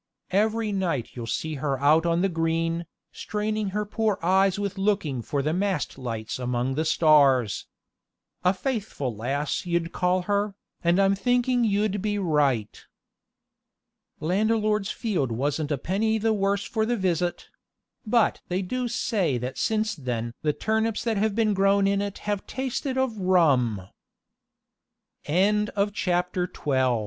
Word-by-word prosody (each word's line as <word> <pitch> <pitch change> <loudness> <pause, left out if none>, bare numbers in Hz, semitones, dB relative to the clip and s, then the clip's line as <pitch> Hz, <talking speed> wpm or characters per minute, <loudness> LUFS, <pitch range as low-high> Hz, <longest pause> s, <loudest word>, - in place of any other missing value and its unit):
Every 215 +2 +1
night 175 - -1
you'll 120 -2 -6
see 160 +6 -2
her 140 -3 -1
out 155 +4 +4
on 170 +1 +2
the - - +4
green, 165 -1 -1 0.2
straining 215 -1 -2
her 210 +2 -2
poor 215 -1 0
eyes 190 +2 +3
with 200 -1 -3
looking 195 - 0
for 140 +4 -2
the 155 +2 0
mast 190 -3 -1
lights 115 -3 -5
among 125 +1 -1
the 155 +4 -1
stars. 140 - +4 0.8
A 180 - +5
faithful 195 - -3
lass 140 - -2
you'd 170 -1 0
call 180 0 +1
her, 205 +1 0 0.3
and 170 +2 +3
I'm 195 0 +4
thinking 245 +3 +1
you'd 205 -2 +1
be 210 0 -1
right. 145 - 0 1.4
Landlord's 210 +3 +1
field 185 - -1
wasn't 145 +5 -1
a 145 - +1
penny 215 - 0
the 220 +1 +1
worse 200 0 0
for 220 -2 -1
the 240 +2 0
visit; 180 -2 -1 0.5
but 230 0 +2
they 185 +2 -1
do 250 +6 -2
say 200 - 0
that 125 +2 -5
since 215 -1 0
then 120 - -4
the 150 - +2
turnips 220 +5 -1
that 225 -3 0
have 210 0 +1
been 220 -2 +2
grown 195 0 +3
in 200 0 +2
it 200 -1 -4
have 205 -1 -2
tasted 265 0 -3
of 260 -3 0
rum. 135 - +2 1.4
THE - - -14
TRANSPLANTED 205 +6 +2
GHOST - - -20
A 180 -3 0
CHRISTMAS 130 -8 0
185 Hz, 150 wpm, -25 LUFS, 150-210 Hz, 1.4 s, A